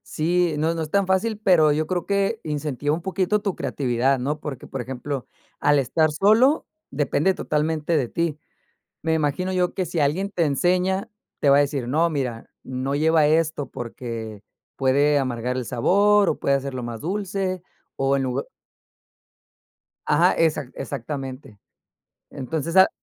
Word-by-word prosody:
Sí, 170 +1 +1
no, 160 +2 +1
no 165 - -3
es 155 - -4
tan 200 -1 +2
fácil, 205 +3 0
pero 170 -7 +5
yo 155 +1 0
creo, 180 0 -2
que 200 +2 0
incentiva 145 -1 -2
un 165 - -2
poquito 190 +2 0
tu 200 -3 -2
creatividad, 130 -1 0
¿no? 150 +4 -2
Porque, 135 -4 -7
por 135 - -5
ejemplo, 130 +2 -5 0.4
al 145 -1 +4
estar 155 +4 +1
solo, 220 - +3 0.2
depende 145 +5 +1
totalmente 155 0 -1
de 130 -6 0
ti. 165 -3 -1 0.7
Me 160 0 +1
imagino 160 +4 0
yo, 180 -1 0
que 185 - -1
si 170 - -3
alguien 165 +8 0
te 175 -4 +1
enseña, 180 - +1 0.3
te 140 - +4
va 140 - +7
a - - +5
decir: 140 -3 0
"No, 160 +6 +2
mira, 130 -7 -3
no 130 +2 -3
lleva 155 0 +3
esto 155 -2 +1
porque, 115 -3 -6 0.3
puede 140 +2 +3
amargar 125 -1 -2
el 130 -1 -3
sabor, 200 - +3
o - - -2
puede 140 - +2
hacerlo 135 -2 -3
más 120 -2 -6
dulce, 190 0 -2 0.3
o 135 0 +1
en 135 - -1
lugar" 130 -1 -2 1.6
Ajá. - - +4
Exac 155 -5 0
exactamente. 135 -3 -6 0.7
Entonces, 155 +4 -4
al 190 0 +8
150 Hz, 160 wpm, -23 LUFS, 135-180 Hz, 1.6 s, al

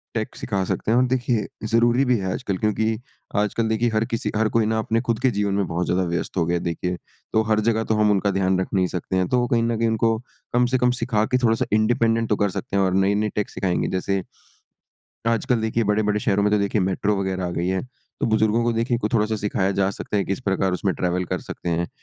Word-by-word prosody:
Take 110 -1 -3
सिखा 100 -5 -2
सकते 110 - -1
हैं। 115 - +4
और 125 - +4
देखिए 120 -3 0 0.2
ज़रूरी 120 +3 +3
भी 125 -2 +3
है 95 -2 -2
आजकल 100 -7 -3
क्योंकि 110 +2 0 0.4
आजकल 105 +2 +1
देखिए 115 +2 +1
हर 110 +1 +2
किसी 115 -2 -2
हर 110 +1 +2
कोई 115 -2 +2
ना 110 0 +1
अपने 115 +1 0
खुद 115 -3 -1
के 130 - +2
जीवन 100 -1 0
में 100 -1 +1
बहुत 85 +1 -1
ज़्यादा 90 +1 +1
व्यस्त 85 +2 -3
हो 85 - +2
गया 85 +1 +1
है - - -5
देखिए। 90 +1 -2 0.4
तो 110 - +4
हर 110 0 +2
जगह 110 0 +1
तो 110 - +1
हम 105 -1 +3
उनका 100 0 +2
ध्यान 95 -1 +1
रख 95 - -1
नहीं 95 -2 +2
सकते 90 +1 -4
हैं। 90 -1 +1
तो 125 - +2
वो 120 - +1
कहीं 115 -1 +2
न 115 -1 0
कहीं 115 0 +1
उनको 110 0 +1 0.4
कम 125 0 +4
से 130 +1 +1
कम 125 0 +3
सिखा 110 -4 +1
के 125 - +4
थोड़ा-सा 115 -1 +2
इंडिपेंडेंट 115 +1 +2
तो 105 - +3
कर 100 -1 +2
सकते 95 - -5
हैं। 100 - +3
और 95 -1 +1
नए-नए 100 +2 +2
टेक 105 - -1
सिखाएँगे। 95 -2 -1
जैसे 95 0 -1 1.1
आजकल 115 +1 +1
देखिए 110 0 0
बड़े-बड़े 105 0 +1
शहरों 100 0 +1
में 105 - +2
तो 105 - +4
देखिए 100 +1 0
मेट्रो 95 +2 0
वग़ैरह 95 -1 -2
आ - - -3
गई 85 0 -2
है। 95 0 0 0.4
तो - - +1
बुज़ुर्गों 110 +1 +2
को 120 - +2
देखिए 115 +1 0
क 105 - +2
थोड़ा-सा 110 0 +2
सिखाया 100 -2 0
जा 100 0 +2
सकता 105 - -4
है 100 - +1
कि - - -14
किस 100 - -3
प्रकार 95 -4 0
उसमें 95 +1 0
ट्रैवल 90 0 -1
कर - - -1
सकते 85 - -7
हैं। 85 +1 -1
105 Hz, 255 wpm, -23 LUFS, 95-115 Hz, 1.1 s, हैं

